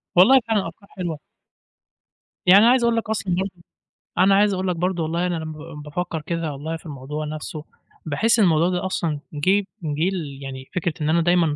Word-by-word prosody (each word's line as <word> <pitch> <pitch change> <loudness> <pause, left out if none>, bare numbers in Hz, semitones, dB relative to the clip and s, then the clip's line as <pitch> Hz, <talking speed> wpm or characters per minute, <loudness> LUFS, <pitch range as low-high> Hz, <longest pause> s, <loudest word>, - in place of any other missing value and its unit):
والله 225 +10 +8
فعلًا 210 -5 +1
أفكار 180 +4 -12
حلوة. 175 -5 -4 1.3
يعني 190 +3 +8
أنا 235 - +7
عايز 255 -1 +3
أقول 235 -1 +3
لك 225 - -2
اصلًا 195 -5 -1
برضه، 190 +1 -1 0.7
أنا 190 +2 +5
عايز 205 0 +4
أقول 190 0 -2
لك 180 - 0
برضه 175 0 -1
والله 170 +3 -1
أنا 175 - -1
لمّا 155 -1 -5
لمّا 155 -1 -9
بافكر 165 +2 -4
كده 165 0 -3
والله 155 +4 -5
في 160 - -21
الموضوع 150 +1 -5
نفسه، 155 0 -6 0.4
باحس 215 +10 +2
الموضوع 170 -4 +4
ده 180 0 -1
أصلًا 165 -5 -1
جِه 190 +7 +2 0.2
جِه 155 +3 0
ليعني 135 -6 -6
فكرة 175 -2 0
إن 150 - 0
أنا 170 +2 +3
دايمًا 170 -3 +3
170 Hz, 190 wpm, -23 LUFS, 155-190 Hz, 1.3 s, والله